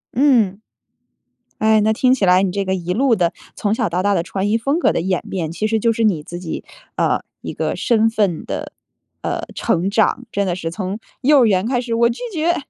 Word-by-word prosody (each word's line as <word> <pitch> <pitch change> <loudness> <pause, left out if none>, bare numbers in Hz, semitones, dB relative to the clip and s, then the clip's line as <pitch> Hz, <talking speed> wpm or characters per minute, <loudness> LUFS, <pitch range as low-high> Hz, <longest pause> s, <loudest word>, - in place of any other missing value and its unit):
嗯， 230 -7 +3 1.0
哎， 220 0 +4
那 215 +1 +2
听 255 +3 +3
起 215 - 0
来 180 0 +5
你 190 - 0
这 200 +1 -2
个 190 - 0
一 180 -1 -2
路 250 +3 +3
的， 175 -4 +1 0.2
从 210 0 0
小 - - 0
到 175 +2 -1
大 205 0 +2
的 170 - 0
穿 195 +2 -2
衣 225 - +3
风 275 +8 0
格 - - +3
的 - - -1
演 185 +1 -1
变， 165 -5 -3
其 215 +6 -2
实 220 0 +1
就 230 +1 +2
是 225 - -1
你 180 -9 +1
自 175 +2 -7
己， 175 -3 -5 0.3
呃， - - +1 0.2
一 - - -6
个 - - -2
身 225 -2 +2
份 205 -7 0
的， - - -5 0.5
呃， - - -2
成 175 +3 0
长。 225 +4 +1
真 200 -1 -1
的 175 - 0
是 165 -2 -4
从 190 +3 -4 0.2
幼 285 +2 +5
儿 - - +5
园 195 -1 +2
开 250 0 +1
始， 240 -1 -3
“我 235 +1 +3
拒 235 - -5
绝”。 335 +1 +1
210 Hz, 245 characters per minute, -19 LUFS, 185-230 Hz, 1.0 s, 来